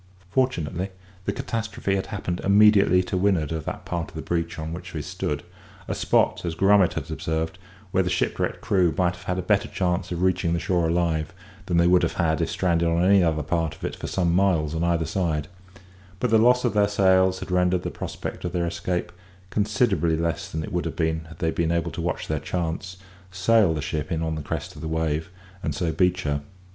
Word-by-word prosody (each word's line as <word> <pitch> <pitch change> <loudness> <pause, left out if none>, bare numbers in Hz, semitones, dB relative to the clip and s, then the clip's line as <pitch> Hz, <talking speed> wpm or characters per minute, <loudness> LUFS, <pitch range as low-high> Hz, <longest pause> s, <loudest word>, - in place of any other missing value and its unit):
Fortunately, 95 - 0 0.4
the - - +1
catastrophe 105 -4 -2
had 95 - -2
happened 95 -4 -3
immediately 100 -2 +5
to 90 - -4
windward 90 -6 +1
of 80 -2 -3
that - - -5
part 85 -3 -3
of - - -17
the 80 - -5
beach 85 -1 -2
on 80 0 -4
which 90 0 -8
we 75 - -2
stood; 75 +1 -3 0.4
a - - -1
spot, - - +2
as 85 -2 -3
Grummet 95 +1 +4
had - - -5
observed, 80 +2 -2 0.3
where 95 - +3
the 90 - -1
shipwrecked - - -1
crew 95 -4 +3
would 90 +1 0
have 90 +1 -4
a 90 - -2
better 100 +2 +2
chance 90 -1 -1
of 90 +1 -2
reaching 90 -2 +2
the 85 - +1
shore 85 -1 +1
alive 80 -1 0 0.3
than 85 - +1
they 85 - +5
would 90 0 +5
have - - 0
had 80 -3 +1
if - - 0
stranded 85 -2 +1
on 85 +1 +2
any 100 -1 +6
other 80 -2 +1
part 80 +1 -1
of - - -17
it - - -3
for - - -6
some 85 -3 +1
miles 85 -5 +2
on 80 +1 -1
either 85 -1 +1
side; 80 -3 -1 0.7
but 125 - 0
the 110 - +6
loss 125 +2 +4
of 120 - +1
their 105 -1 +4
sails 95 -2 +3
had - - -7
rendered 90 0 +2
the - - -3
prospect - - -6
of 90 - -3
their 85 -1 0
escape 85 +1 -2 0.4
considerably 100 -6 +1
less 85 0 -2
than 80 0 -3
it - - -7
would 90 -1 -1
have 80 - -3
been 80 -1 -1
had 80 +1 -13
they 80 -1 0
been 85 0 0
able 85 0 0
to - - -5
watch - - -2
their - - -1
chance, 90 +1 -3 0.3
sail 95 +1 +3
the 75 - -3
ship 75 +3 -3
in 80 -1 0
on 80 -1 -1
the 80 - -4
crest - - -5
of - - -9
a - - -3
wave, 80 0 -1 0.3
and - - -2
so 85 -5 0
beach 90 +2 +1
her. 70 -1 -1
85 Hz, 220 wpm, -25 LUFS, 80-95 Hz, 0.7 s, any